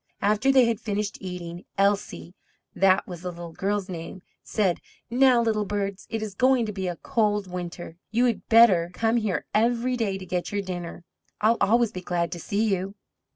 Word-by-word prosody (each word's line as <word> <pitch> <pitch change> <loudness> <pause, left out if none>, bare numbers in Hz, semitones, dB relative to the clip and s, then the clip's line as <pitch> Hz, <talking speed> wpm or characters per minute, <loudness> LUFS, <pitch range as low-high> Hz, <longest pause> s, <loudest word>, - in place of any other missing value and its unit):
After 215 +6 +3
they 260 -2 +6
had 230 -2 0
finished 210 -2 -3
eating, 180 -2 -7
Elsie 200 -3 0 0.4
(that 190 0 +4
was 175 -2 -8
the 180 - -4
little 170 -1 -8
girl's 200 +2 -2
name) 175 +1 -7 0.2
said: 195 -6 0 0.3
"Now, 255 0 +5
little 215 -2 +1
birds, 200 -1 -3
it 225 -1 -3
is 210 -2 -5
going 255 +1 +3
to 210 - -4
be 190 -1 -3
a 175 - -2
cold 210 -3 0
winter, 175 -2 -7
you 235 +2 +1
would 240 -3 0
better 205 -7 +6
come 225 +1 +1
here 215 -5 -1
every 235 +3 +2
day 210 -5 -1
to 190 - -9
get 180 -1 -3
your 205 0 -1
dinner. 175 -2 -6 0.4
I'll 225 +2 +3
always 235 +2 +3
be 185 - -6
glad 170 -2 -1
to 175 - -5
see 205 +6 -1
you." 190 +2 -3
200 Hz, 190 wpm, -25 LUFS, 180-225 Hz, 0.4 s, they